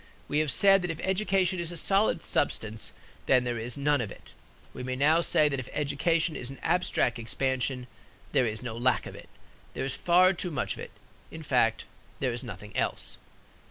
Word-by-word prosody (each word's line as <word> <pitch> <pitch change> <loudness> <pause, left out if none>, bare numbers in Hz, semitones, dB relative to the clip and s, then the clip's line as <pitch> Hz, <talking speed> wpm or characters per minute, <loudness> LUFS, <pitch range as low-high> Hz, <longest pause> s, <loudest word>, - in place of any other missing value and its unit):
We 145 - +1
have 155 -1 +1
said 195 +7 +5
that 180 - -3
if 165 -1 -4
education 190 -1 +1
is 170 0 -2
a 175 - -5
solid 195 +5 +2
substance, 110 -1 -1 0.4
then 130 -1 +5
there 120 -2 -2
is 120 +4 -5
none 145 -1 +2
of 105 -4 -4
it. - - -13 0.4
We - - -7
may 130 0 -3
now 155 +5 +4
say 155 -2 +3
that 135 -2 -1
if 130 - -7
education 155 +3 0
is 125 - -5
an 135 - -9
abstract 165 -8 +1
expansion 130 +2 -1 0.5
there 125 - +3
is 110 +2 -4
no 120 -3 -5
lack 125 +1 +1
of - - -8
it. - - -12 0.5
There 130 - -2
is 135 -1 -2
far 180 +2 +4
too 180 0 -2
much 150 - -2
of - - -11
it. - - -7 0.4
In 160 0 -9
fact, 125 -6 +2 0.3
there 130 -3 0
is 120 - -5
nothing 105 -3 -9
else. - - -2
140 Hz, 200 wpm, -28 LUFS, 125-170 Hz, 0.5 s, said